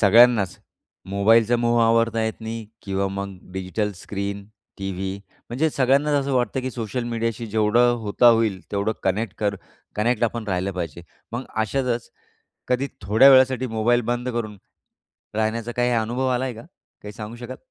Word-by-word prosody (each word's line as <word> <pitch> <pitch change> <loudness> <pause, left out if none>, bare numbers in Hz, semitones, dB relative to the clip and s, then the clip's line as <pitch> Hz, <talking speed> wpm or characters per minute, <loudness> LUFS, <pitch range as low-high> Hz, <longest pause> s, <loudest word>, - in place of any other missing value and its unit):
सगळ्यांनाच 110 -1 +5 0.5
मोबाईलचा 115 +4 +4
मोह 120 0 +2
आवरता 115 0 +2
येत 110 +1 -4
नाही 110 0 -5 0.2
किंवा 100 0 -1
मग 100 0 -5 0.2
डिजिटल 95 +3 -2
स्क्रीन, 100 +2 -5 0.3
टीव्ही 95 0 -4 0.3
म्हणजे 150 +7 +1
सगळ्यांनाच 140 +2 +2
असं 140 0 -3
वाटतं, 125 +1 0
की 130 0 -3
सोशल 120 0 -4
मीडियाशी 115 0 -2
जेवढं 110 +3 +3
होता 105 +3 +2
होईल 115 -5 +3
तेवढं 100 +2 0
कनेक्ट 100 +2 -1
कर 100 -1 0 0.4
कनेक्ट 115 +2 +1
आपण 115 0 -2
राहिलं 95 +1 -1
पाहिजे. 85 -2 -5 0.3
मग 120 +3 -3
अशातच 120 +2 -1 0.6
कधी 130 +2 +1
थोड्या 110 +8 +6
वेळासाठी 130 -1 +5
मोबाईल 115 +1 +2
बंद 120 +1 -3
करून, 110 -3 -4 0.8
राहण्याचा 110 +2 -1
काही 120 +1 +1
अनुभव 120 +3 0
आलाय 125 0 -1
आहे - - -12
का, - - -14 0.4
काही 105 - -8
सांगू 110 +2 -8
शकाल? 120 +2 -8
115 Hz, 155 wpm, -23 LUFS, 100-120 Hz, 0.8 s, थोड्या